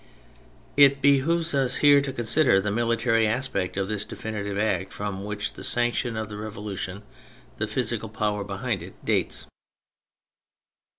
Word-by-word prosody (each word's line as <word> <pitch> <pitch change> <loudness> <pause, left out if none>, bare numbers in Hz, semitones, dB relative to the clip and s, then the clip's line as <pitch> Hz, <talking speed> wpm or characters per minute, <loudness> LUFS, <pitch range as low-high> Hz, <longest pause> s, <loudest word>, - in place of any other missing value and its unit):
It 140 -1 +6
behoves 155 +5 +3
us 135 -3 +1
here 145 -1 +6
to 140 -1 -3
consider 120 -2 +3
the 100 +1 -1
military 115 0 +2
aspect 105 -6 -2
of 95 -1 0
this 105 -1 -1
definitive 100 -2 -5
act 95 -3 0
from 100 -1 -5
which 105 0 -3
the - - -10
sanction 120 -1 +1
of 110 -1 -3
the 105 0 -7
Revolution, 105 -2 -6 0.5
the - - -1
physical - - -2
power 105 -1 -1
behind 100 0 -3
it, 90 +3 -10
dates. - - 0
110 Hz, 140 wpm, -25 LUFS, 100-130 Hz, 0.5 s, It